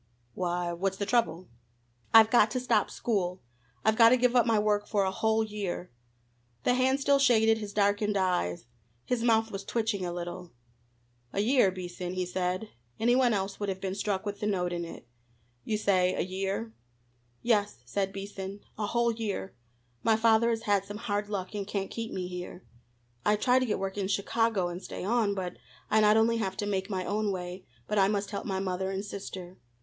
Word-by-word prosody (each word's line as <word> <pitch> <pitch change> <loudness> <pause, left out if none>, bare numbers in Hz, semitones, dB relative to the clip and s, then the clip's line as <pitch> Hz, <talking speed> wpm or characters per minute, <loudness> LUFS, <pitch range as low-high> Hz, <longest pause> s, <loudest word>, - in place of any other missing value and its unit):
"Why, 175 -1 -1
what's 190 +2 -1
the 200 - -2
trouble?" 200 -7 +1 0.6
"I've 220 -1 +8
got 225 -3 +5
to 255 +4 -2
stop 250 - +2
school! 185 -5 -1 0.5
I've 220 0 +4
got 230 -1 +8
to 255 - +5
give 250 0 +2
up 240 -1 +5
my 225 -1 +3
work 210 0 +1
for 205 -3 +1
a 190 - 0
whole 220 +3 +1
year!" 205 -4 -4 0.7
The - - +3
hand 260 +2 +2
still 280 0 +3
shaded 225 -4 +4
his 210 -2 -6
darkened 205 0 +1
eyes. 180 - 0 0.4
His 250 -2 0
mouth 225 -1 +3
was 195 0 -5
twitching 220 -3 -1
a 175 - -2
little. 175 0 -6 0.8
"A 200 - +1
year, 245 -2 +4
Beason?" 180 -1 -5
he 185 0 -1
said 180 +3 -2 0.3
any 240 +2 +3
one 255 -2 +4
else 195 -2 -2
would 205 -1 -2
have 190 -1 -3
been 190 -1 -3
struck 200 0 -2
with 205 0 -4
the 210 - -1
note 180 -3 0
in 170 0 -3
it 165 -7 -10 0.6
"You 215 - 0
say 185 -3 +2
a - - 0
year?" 195 +4 -3 0.7
"Yes," 205 - +1
said 195 +10 -1
Beason, 195 0 -7 0.2
"a 210 - 0
whole 235 +1 +2
year. 215 -4 -4 0.5
My 225 0 +3
father 225 +1 +4
has 225 -1 -1
had 200 -3 +2
some 205 +1 -7
hard 205 -1 -2
luck 195 -1 -4
and 200 -2 -4
can't 200 -2 -3
keep 230 -1 -4
me 185 - -3
here. 180 0 -7 0.6
I'd 210 0 +2
try 250 +2 +4
to 255 - -1
get 210 - 0
work 195 +1 -3
in 190 - -1
Chicago, 200 0 +1
and 175 +1 -6
stay - - -7
on, 210 0 +1
but 180 -2 -4 0.3
I 220 - +5
not 210 +1 +5
only 230 +1 +3
have 190 -4 -2
to 210 - -2
make 195 -1 -2
my 185 -2 -2
own 210 0 0
way, 180 0 -6 0.2
but 210 -1 0
I 195 - +5
must 205 0 -1
help 200 - -4
my 190 -2 -1
mother 190 0 -2
and 195 +1 -3
sister. 190 -2 -8
205 Hz, 200 wpm, -29 LUFS, 190-220 Hz, 0.8 s, I've